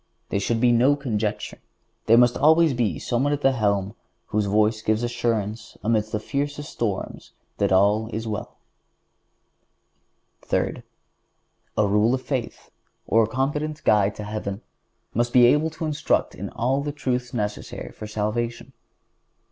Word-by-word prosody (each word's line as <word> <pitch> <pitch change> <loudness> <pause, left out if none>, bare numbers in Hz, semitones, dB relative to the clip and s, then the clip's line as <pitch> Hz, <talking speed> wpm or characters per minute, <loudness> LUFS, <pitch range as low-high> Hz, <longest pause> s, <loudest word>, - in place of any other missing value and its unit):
There 100 - 0
should 115 +3 0
be 120 0 +4
no 125 +5 +4
conjecture. 110 -7 -3 0.4
But - - -42
there 115 - +7
must 120 0 +5
be - - -6
always 140 - +3
someone 130 +4 +1
at 145 - -2
the 135 - +4
helm 100 -4 0 0.4
whose 105 -1 0
voice 110 +2 +2
gives 110 +1 0
assurance 115 -2 -2
amid 110 0 +2
the 110 0 -3
fiercest 145 +5 -3
storms 105 -5 -4 0.3
that - - +1
all 105 +4 +3
is 110 +1 -4
well. 105 -1 -5 1.8
Third—A 105 - -5
rule 105 +5 +3
of 130 - -6
faith, 130 -5 -4 0.3
or 115 - +4
a 110 - +2
competent 150 +5 -2
guide 105 -2 +3
to 105 - -6
heaven, 105 -1 -5 0.5
must 120 +1 0
be 125 -1 +7
able 150 +6 +4
to 160 +1 -6
instruct 150 -1 0
in - - -6
all 130 +4 0
the 145 +1 -3
truths 125 -4 -2
necessary 105 -3 -4
for 105 - -8
salvation. 115 +4 -3
115 Hz, 150 wpm, -24 LUFS, 105-130 Hz, 1.8 s, there